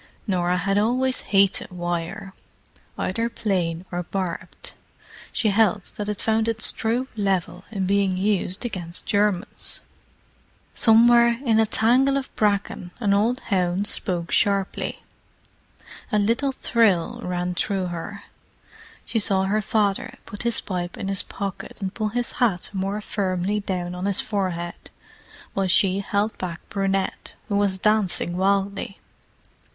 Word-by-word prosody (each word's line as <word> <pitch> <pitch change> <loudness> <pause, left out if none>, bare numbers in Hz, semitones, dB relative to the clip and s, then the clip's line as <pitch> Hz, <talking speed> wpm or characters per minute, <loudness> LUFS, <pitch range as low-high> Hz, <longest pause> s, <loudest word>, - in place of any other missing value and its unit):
Norah 180 -3 +1
had 195 +3 +1
always 255 +4 +1
hated 195 -1 +2
wire, 175 +3 -4 0.6
either 230 +5 -1
plain 180 -6 -1
or 175 0 -2
barbed. 180 -1 -5 0.6
She 220 - +1
held 205 -2 +2
that 210 0 -4
it 210 - -3
found 220 0 +1
its 230 0 +1
true 235 +4 -1
level 190 -3 -1
in 195 -3 -2
being 195 -1 +2
used 195 +1 0
against 175 -6 -4
Germans. 205 -1 0 0.9
Somewhere 235 +1 +6
in 225 -2 +4
a 220 - +4
tangle 255 +6 +3
of 270 - -5
bracken 200 -3 0
an 205 -4 +2
old 225 +5 +2
hound 185 +1 +1
spoke 175 -5 -1
sharply. 200 -1 0 1.1
A 210 - +3
little 230 +7 +2
thrill 225 -9 +2
ran 180 0 -2
through 190 +1 -1
her. 200 +4 -6 0.8
She 225 - +1
saw 195 -2 +3
her 205 +3 +1
father 205 -2 0
put 205 - -8
his 235 -2 +2
pipe 175 -2 -4
in 195 - -4
his 195 -1 +1
pocket 200 -1 -6
and 195 -2 -3
pull 215 -1 -1
his 240 +3 0
hat 205 -8 0
more 195 +2 -2
firmly 195 -1 -1
down 180 -3 -3
on 180 +2 -3
his 200 -1 +2
forehead, 180 -5 -3 0.6
while 195 -1 0
she 185 +1 +3
held 205 +2 -1
back 175 -2 -5
Brunette, 195 -1 -1
who 200 - 0
was 200 -2 +2
dancing 200 -4 +2
wildly. 195 +1 0
200 Hz, 135 wpm, -24 LUFS, 185-215 Hz, 1.1 s, Somewhere